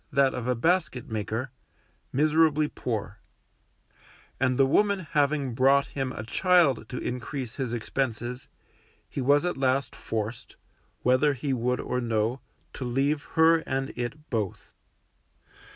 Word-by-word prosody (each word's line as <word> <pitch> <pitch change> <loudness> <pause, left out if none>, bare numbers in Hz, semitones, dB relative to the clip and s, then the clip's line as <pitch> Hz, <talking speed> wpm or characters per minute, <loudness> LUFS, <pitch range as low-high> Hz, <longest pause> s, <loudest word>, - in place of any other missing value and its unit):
that 135 -1 +3
of 125 -1 -4
a 125 - +2
basket 160 -3 0
maker) 110 +4 -3 0.6
miserably 155 +1 +3
poor; 105 -7 -4 1.2
and 130 -1 +2
the 135 - +5
woman 200 +7 +2
having 145 -3 +1
brought 135 +3 +4
him 135 -2 -3
a 110 - -6
child 160 - +3
to 125 - -5
increase 125 0 -4
his 130 -4 -2
expenses, 120 +1 -3 0.6
he 140 - -4
was 145 +5 +4
at 180 - -1
last 135 0 0
forced, 110 +1 -5 0.5
whether 130 +4 +4
he 135 +1 -2
would 125 0 0
or 125 - -2
no, 115 +2 0 0.3
to - - -6
leave 135 +4 0
her 165 0 +6
and 135 -3 -3
it 130 +6 -6
both. 110 -6 -3
130 Hz, 135 wpm, -27 LUFS, 120-145 Hz, 1.2 s, her